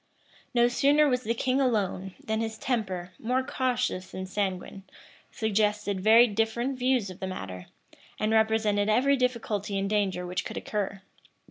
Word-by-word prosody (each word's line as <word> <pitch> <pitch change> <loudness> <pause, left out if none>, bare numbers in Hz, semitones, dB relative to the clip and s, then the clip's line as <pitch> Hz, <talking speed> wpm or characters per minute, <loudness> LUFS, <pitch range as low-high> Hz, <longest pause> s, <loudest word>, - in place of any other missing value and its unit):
No 240 0 +5
sooner 285 +5 +4
was 250 -2 +1
the 230 -1 -1
king 260 +3 +1
alone, 195 -6 -1
than 220 0 -1
his 225 -1 -3
temper, 190 -9 -2
more 255 +3 0
cautious 250 -8 -1
than 185 - -6
sanguine, 195 0 -3 0.5
suggested 210 -2 0
very 225 +4 +7
different 235 +4 -1
views 250 -6 +1
of 180 - -12
the 190 - -3
matter, 95 - -7 0.5
and 215 +1 0
represented 220 -2 +2
every 265 +6 +4
difficulty 225 -6 -1
and 195 0 -1
danger 195 -3 0
which 180 +1 -2
could - - -6
occur. 200 -2 -3
220 Hz, 150 wpm, -28 LUFS, 195-245 Hz, 0.5 s, very